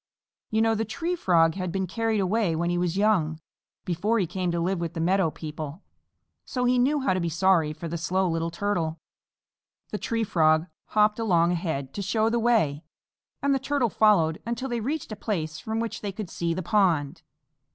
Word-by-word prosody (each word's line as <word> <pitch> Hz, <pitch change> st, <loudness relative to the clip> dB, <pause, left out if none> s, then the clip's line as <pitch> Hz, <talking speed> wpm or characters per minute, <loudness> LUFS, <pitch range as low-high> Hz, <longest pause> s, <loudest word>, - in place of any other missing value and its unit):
You 220 Hz, 0 st, +2 dB
know 225 Hz, 0 st, +3 dB
the 220 Hz, 0 st, 0 dB
Tree 330 Hz, -, -2 dB
Frog 165 Hz, -, +3 dB
had 185 Hz, -1 st, -3 dB
been 190 Hz, +1 st, -1 dB
carried 225 Hz, +3 st, -1 dB
away 195 Hz, -2 st, +1 dB
when 170 Hz, +2 st, 0 dB
he 175 Hz, -, 0 dB
was 175 Hz, 0 st, -1 dB
young, 180 Hz, -7 st, +2 dB, 0.5 s
before 195 Hz, +6 st, 0 dB
he 195 Hz, -, +2 dB
came 180 Hz, +1 st, -2 dB
to 170 Hz, 0 st, -1 dB
live 180 Hz, +2 st, 0 dB
with 170 Hz, -1 st, -4 dB
the -, -, -3 dB
meadow 185 Hz, +1 st, +2 dB
people, 155 Hz, +2 st, -7 dB, 0.6 s
so 250 Hz, -2 st, -2 dB
he 250 Hz, 0 st, +3 dB
knew 285 Hz, +4 st, +2 dB
how 265 Hz, -, +2 dB
to 185 Hz, -, 0 dB
be 170 Hz, -1 st, -1 dB
sorry 170 Hz, -2 st, +3 dB
for 160 Hz, +2 st, -6 dB
the 170 Hz, +1 st, -4 dB
Slow 185 Hz, +3 st, +1 dB
Little 165 Hz, 0 st, -1 dB
Turtle. 170 Hz, -3 st, -2 dB, 0.9 s
The -, -, -3 dB
Tree 230 Hz, -2 st, -1 dB
Frog 160 Hz, -5 st, +3 dB, 0.2 s
hopped 210 Hz, +1 st, +2 dB
along 175 Hz, -6 st, +3 dB
ahead 160 Hz, -6 st, -3 dB
to 205 Hz, -, -4 dB
show 220 Hz, +3 st, +1 dB
the 235 Hz, -, +1 dB
way, 195 Hz, -11 st, +2 dB, 0.6 s
and 280 Hz, 0 st, +3 dB
the 270 Hz, -, +1 dB
Turtle 270 Hz, -3 st, 0 dB
followed 170 Hz, -7 st, +3 dB
until 235 Hz, +3 st, -3 dB
they 240 Hz, -1 st, -1 dB
reached 275 Hz, +2 st, -3 dB
a -, -, -3 dB
place 165 Hz, -7 st, -3 dB
from 220 Hz, +5 st, -3 dB
which 230 Hz, 0 st, -3 dB
they 205 Hz, -, -3 dB
could 195 Hz, -2 st, -7 dB
see 170 Hz, -1 st, -1 dB
the 185 Hz, -, -3 dB
pond. 170 Hz, -5 st, +1 dB
185 Hz, 205 wpm, -26 LUFS, 165-220 Hz, 0.9 s, know